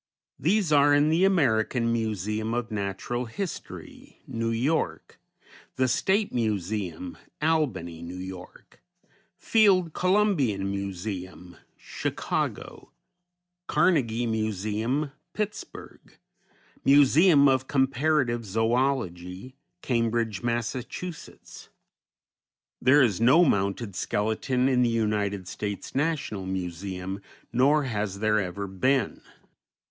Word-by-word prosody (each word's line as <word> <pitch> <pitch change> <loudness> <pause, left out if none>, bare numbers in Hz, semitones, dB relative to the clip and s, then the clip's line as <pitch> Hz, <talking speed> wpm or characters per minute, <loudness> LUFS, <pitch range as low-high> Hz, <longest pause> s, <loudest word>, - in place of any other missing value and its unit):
These 185 +2 +1
are 145 0 +5
in 145 +1 +3
the 165 +4 +3
American 120 - +2
Museum 110 0 -2
of 120 -1 -3
Natural 105 +4 -3
History, 175 - -8
New 115 0 -3
York; 130 +8 -1 0.6
the 130 0 +2
State 190 - +1
Museum, 100 -6 -2 0.2
Albany, 150 - 0
N. 90 +2 -7
Y.; 90 0 -10 0.9
Field 190 -8 +3
Columbian 175 - +1
Museum, 95 -3 -6 0.2
Chicago; - - -4 0.8
Carnegie 120 -9 +2
Museum, 110 +5 -1 0.2
Pittsburg; 210 -1 -7 0.7
Museum 145 +2 +6
of 130 -1 +2
Comparative 135 -2 +1
Zoölogy, 110 -2 -1 0.3
Cambridge, 115 -4 0
Mass. 120 -1 -1 2.1
There 135 +4 +6
is 110 -4 +1
no 140 +9 +6
mounted 100 - 0
skeleton 110 +6 0
in 130 -2 +3
the 120 - +3
United 105 -4 -1
States 100 +1 -5
National 135 - -1
Museum, 95 +1 -4 0.3
nor 140 +5 +4
has 105 -6 -3
there 105 +1 +2
ever 100 +1 -3
been. 125 +8 0
115 Hz, 90 wpm, -26 LUFS, 100-140 Hz, 2.1 s, Museum